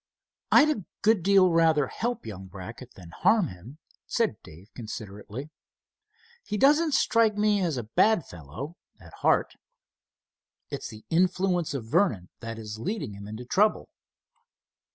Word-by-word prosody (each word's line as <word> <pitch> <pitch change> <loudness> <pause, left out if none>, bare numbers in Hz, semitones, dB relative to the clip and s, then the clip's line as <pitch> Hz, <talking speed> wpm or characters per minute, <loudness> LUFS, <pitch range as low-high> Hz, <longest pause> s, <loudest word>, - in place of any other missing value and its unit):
"I'd 305 +1 +6
a 205 - -7 0.2
good 220 -3 +4
deal 190 0 +5
rather 160 -3 +4
help 240 - -3
young 95 -3 -8
Brackett 105 +7 -10
than 90 -3 -12
harm 190 - +2
him," 95 - -12 0.3
said - - 0
Dave, 90 +8 -15
considerately. 110 +4 -8 0.9
"He 210 - -3
doesn't 295 +4 +4
strike 225 -5 +3
me 210 -1 +2
as 165 -7 0
a 120 - -3
bad 170 - +2
fellow 90 - -9 0.2
at - - -15
heart. - - +1 1.1
It's - - -4
the 110 -1 -12
influence 180 -2 +1
of 125 -5 -4
Vernon 115 - +1
that 115 -1 -6
is 110 -1 -7
leading 165 - -3
him 100 +1 -9
into 110 +4 -7
trouble." 210 - +2
150 Hz, 140 wpm, -27 LUFS, -, 1.1 s, I'd